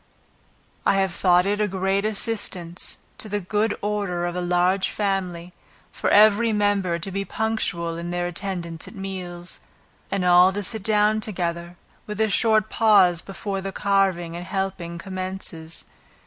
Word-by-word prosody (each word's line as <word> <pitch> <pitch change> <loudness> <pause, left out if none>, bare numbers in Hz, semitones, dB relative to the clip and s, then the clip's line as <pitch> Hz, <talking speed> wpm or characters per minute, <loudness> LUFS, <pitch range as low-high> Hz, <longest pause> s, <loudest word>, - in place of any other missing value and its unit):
I - - +3
have 190 -2 +1
thought 180 0 +4
it 205 +1 0
a 210 - +2
great 195 +1 0
assistance 195 -5 -2 0.2
to 215 - -3
the 205 0 0
good 210 +3 0
order 200 -4 -1
of 175 0 -3
a 180 - -1
large 180 +2 +2
family, 180 -4 -2 0.4
for - - -1
every 215 +2 +6
member 205 -4 +1
to 180 +4 -6
be 195 +1 -2
punctual 185 -7 -1
in 170 +1 -5
their 175 0 -1
attendance 175 -2 -5
at - - -11
meals, 180 -3 -5 0.5
and 195 -2 -1
all 180 +1 +7
to 205 +1 -3
sit 220 +3 -3
down 210 +1 +2
together, 175 -4 -3 0.3
with 210 0 -5
a 220 0 +3
short 220 0 +3
pause 195 -7 +4
before 195 0 -4
the 195 0 -4
carving 190 -4 +1
and 175 +1 -6
helping 190 -3 -3
commences. 185 -3 -5
190 Hz, 155 wpm, -24 LUFS, 175-205 Hz, 0.5 s, all